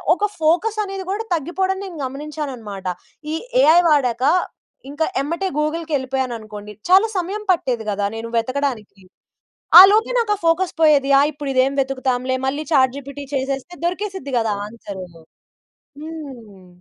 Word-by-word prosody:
ఒక 410 Hz, -, -6 dB, 0.2 s
ఫోకస్ 355 Hz, +8 st, +1 dB
అనేది 390 Hz, -1 st, -6 dB
కూడా 425 Hz, +3 st, -2 dB
తగ్గిపోడం 375 Hz, +5 st, -2 dB
నేను 360 Hz, -4 st, -9 dB
గమనించాననమాట. 260 Hz, -9 st, -6 dB, 0.5 s
ఈ -, -, 0 dB, 0.3 s
ఏఐ 325 Hz, +3 st, +7 dB
వాడాక, 255 Hz, -5 st, +2 dB, 0.7 s
ఇంక 290 Hz, +2 st, -9 dB, 0.2 s
ఎమ్మటే 335 Hz, +7 st, -2 dB
గూగుల్‌కెళిపోయాననుకోండి! 260 Hz, -9 st, -3 dB, 0.2 s
చాలా 390 Hz, +4 st, +6 dB
సమయం 395 Hz, +4 st, -3 dB
పట్టేది 245 Hz, -9 st, -2 dB
కదా, 200 Hz, 0 st, -1 dB
నేను 230 Hz, +1 st, -5 dB
వెతకడానికి. 245 Hz, -5 st, -3 dB, 0.8 s
ఆ -, -, +14 dB
లోపే 440 Hz, +4 st, +2 dB
నాకా 425 Hz, -3 st, +1 dB
ఫోకస్ 335 Hz, +2 st, +1 dB
పోయేది. 290 Hz, -3 st, +4 dB
ఆ! -, -, +6 dB
ఇప్పుడిదేం 275 Hz, -2 st, 0 dB
వెతుకుతాంలే. 260 Hz, -1 st, -1 dB
మళ్ళీ 290 Hz, +3 st, -2 dB
ఛాట్ 260 Hz, -3 st, +4 dB
జిపిటి 280 Hz, +1 st, -8 dB
చేసేస్తే 270 Hz, +5 st, -3 dB
దొరికేసిద్ది 370 Hz, -5 st, -3 dB
గదా 225 Hz, -2 st, 0 dB
ఆన్సరూను. 195 Hz, -6 st, -10 dB, 0.8 s
హ్మ్. 265 Hz, -, -10 dB
280 Hz, 125 wpm, -20 LUFS, 245-335 Hz, 0.8 s, ఆ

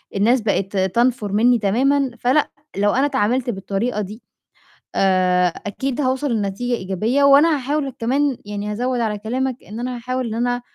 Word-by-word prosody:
الناس 230 Hz, +5 st, +3 dB
بقت 200 Hz, -2 st, -1 dB
تنْفُر 210 Hz, +2 st, +1 dB
منّي 235 Hz, +3 st, +3 dB
تمامًا 260 Hz, +6 st, +2 dB
فلأ، 260 Hz, +5 st, +2 dB, 0.3 s
لو 205 Hz, +1 st, +3 dB
أنا 265 Hz, +3 st, +2 dB
اتعاملت 255 Hz, -2 st, 0 dB
بالطريقة 205 Hz, +2 st, -2 dB
دي، 210 Hz, +4 st, -7 dB, 0.7 s
آآ، 185 Hz, -1 st, +3 dB, 0.2 s
أكيد 265 Hz, +7 st, -3 dB
هوصل 260 Hz, +1 st, 0 dB
لنتيجة 220 Hz, +3 st, -1 dB
إيجابية 215 Hz, +9 st, 0 dB
وأنا 290 Hz, +3 st, +6 dB
هاحاول 280 Hz, +1 st, -2 dB
ك 255 Hz, -, -13 dB
كمان 270 Hz, +3 st, +1 dB
يعني 205 Hz, 0 st, -4 dB
-هازوّد 250 Hz, +1 st, -1 dB
على 215 Hz, -2 st, -1 dB
كلامك 255 Hz, +4 st, -3 dB
إن 220 Hz, +3 st, -8 dB
أنا 250 Hz, 0 st, -3 dB
هاحاول 255 Hz, +1 st, -3 dB
إن 220 Hz, -, -4 dB
أنا 245 Hz, +1 st, -1 dB
240 Hz, 160 wpm, -20 LUFS, 205-260 Hz, 0.7 s, وأنا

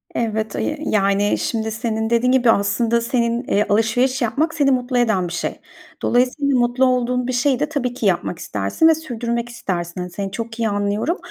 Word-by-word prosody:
Evet, 220 Hz, -2 st, -2 dB
ı -, -, -2 dB
yi 305 Hz, -, -2 dB
yani, 200 Hz, 0 st, +2 dB
şimdi, 220 Hz, -1 st, -2 dB
senin 220 Hz, 0 st, -2 dB
dediğin 235 Hz, +2 st, +2 dB
gibi, 250 Hz, -3 st, +4 dB
aslında, 230 Hz, +3 st, +1 dB
senin 235 Hz, 0 st, 0 dB
eee, 205 Hz, +1 st, +2 dB
alışveriş 245 Hz, +5 st, +2 dB
yapmak 295 Hz, +8 st, 0 dB
seni 285 Hz, -3 st, +2 dB
mutlu 250 Hz, 0 st, 0 dB
eden 220 Hz, -7 st, +2 dB
bir 170 Hz, -, -6 dB
şey. 170 Hz, -, -3 dB, 0.4 s
Dolayısıyla 255 Hz, +2 st, +2 dB
mutlu 245 Hz, +2 st, +2 dB
olduğun 250 Hz, 0 st, +1 dB
bir -, -, -1 dB
şeyi 250 Hz, +1 st, +1 dB
de, 300 Hz, -, -1 dB
tabii 260 Hz, -5 st, -2 dB
ki, 240 Hz, -, -4 dB
yapmak 180 Hz, -2 st, 0 dB
istersin 100 Hz, -, +1 dB
ve 325 Hz, -, +5 dB
sürdürmek 235 Hz, -5 st, -3 dB
istersin. 180 Hz, -7 st, -4 dB
Hani, 180 Hz, -, -5 dB
seni 195 Hz, +1 st, -4 dB
çok 230 Hz, +2 st, -6 dB
iyi 225 Hz, -1 st, +1 dB
anlıyorum 205 Hz, -, -1 dB
235 Hz, 190 wpm, -20 LUFS, 210-250 Hz, 0.4 s, ve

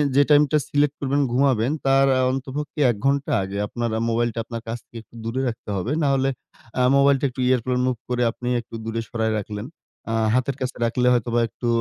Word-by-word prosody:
যে 140 Hz, -, +6 dB
টাইমটা 150 Hz, 0 st, +5 dB
সিলেক্ট 145 Hz, 0 st, +2 dB
করবেন, 140 Hz, +1 st, +1 dB
ঘুমাবেন 130 Hz, -1 st, +2 dB
তার 135 Hz, 0 st, +4 dB
আ -, -, +3 dB
অন্ততপক্ষে 135 Hz, +3 st, -5 dB
১ -, -, -4 dB
ঘন্টা 140 Hz, +2 st, +1 dB
আগে 95 Hz, +1 st, -5 dB
আপনার 120 Hz, +2 st, -3 dB
আ -, -, -2 dB
মোবাইলটা 115 Hz, 0 st, 0 dB
আপনার 115 Hz, 0 st, -6 dB
কাছ 115 Hz, +1 st, -3 dB
থেকে 120 Hz, -, -12 dB
একটু 115 Hz, -, -22 dB
দূরে 120 Hz, +3 st, -2 dB
রাখতে 115 Hz, -2 st, -6 dB
হবে। 100 Hz, +8 st, -2 dB
নাহলে 135 Hz, -1 st, +2 dB, 0.5 s
আ -, -, +4 dB
মোবাইলটা 140 Hz, 0 st, +4 dB
একটু 130 Hz, +1 st, -6 dB
airplane 125 Hz, 0 st, +1 dB
mode 125 Hz, -3 st, -1 dB
করে 125 Hz, 0 st, +1 dB
আপনি 125 Hz, -, -8 dB
একটু 115 Hz, -, -12 dB
দূরে 115 Hz, 0 st, -2 dB
সরায় 110 Hz, -1 st, -1 dB
রাখলেন। 105 Hz, +1 st, -6 dB, 0.5 s
আ -, -, -1 dB, 0.2 s
হাতের 130 Hz, +2 st, +1 dB
কাছে 130 Hz, 0 st, -2 dB
রাখলে 125 Hz, +2 st, +1 dB
হয়তোবা 120 Hz, 0 st, +1 dB
একটু 120 Hz, +3 st, -6 dB
125 Hz, 200 wpm, -23 LUFS, 115-135 Hz, 0.5 s, যে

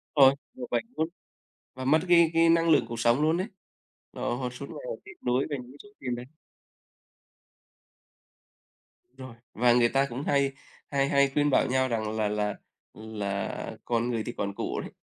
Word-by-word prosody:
Rồi, 135 Hz, -2 st, +8 dB, 0.2 s
đổ 255 Hz, -1 st, -7 dB
bệnh -, -, 0 dB
luôn 160 Hz, -, +1 dB, 0.7 s
và 130 Hz, 0 st, -6 dB
mất 155 Hz, +4 st, +5 dB
cái 170 Hz, -2 st, +6 dB
cái 165 Hz, 0 st, +5 dB
năng 165 Hz, 0 st, +4 dB
lượng 155 Hz, -, +4 dB
cuộc 115 Hz, 0 st, -5 dB
sống 120 Hz, +4 st, +3 dB
luôn 160 Hz, +2 st, +3 dB
ấy. 185 Hz, -, -1 dB, 0.7 s
Họ 120 Hz, -, -2 dB
họ 125 Hz, -1 st, -3 dB
suốt 125 Hz, +3 st, -8 dB
ngày -, -, -8 dB, 0.2 s
tiếc 415 Hz, -, -10 dB
nuối 125 Hz, +2 st, +2 dB
về 145 Hz, -, -2 dB
những 125 Hz, +2 st, -14 dB
số 205 Hz, -, -16 dB
tiền 125 Hz, -2 st, -3 dB
đấy. 120 Hz, +1 st, -7 dB, 2.9 s
Rồi. 130 Hz, -3 st, -9 dB, 0.2 s
Và 120 Hz, +1 st, +4 dB
người 120 Hz, -1 st, +4 dB
ta 135 Hz, +2 st, +2 dB
cũng 135 Hz, +1 st, -5 dB
hay 140 Hz, -1 st, +2 dB, 0.4 s
hay 140 Hz, -1 st, +1 dB
hay 140 Hz, 0 st, +4 dB
khuyên 145 Hz, 0 st, +2 dB
bảo -, -, +3 dB
nhau 130 Hz, 0 st, +2 dB
rằng 110 Hz, -3 st, -2 dB
là 110 Hz, -1 st, +1 dB
là 105 Hz, 0 st, -1 dB, 0.4 s
là 105 Hz, -3 st, -4 dB
còn 120 Hz, 0 st, 0 dB
người 115 Hz, -2 st, -1 dB
thì -, -, -3 dB
còn 100 Hz, -1 st, -2 dB
của -, -, -3 dB
đấy. -, -, -8 dB
130 Hz, 185 wpm, -28 LUFS, 115-145 Hz, 2.9 s, Rồi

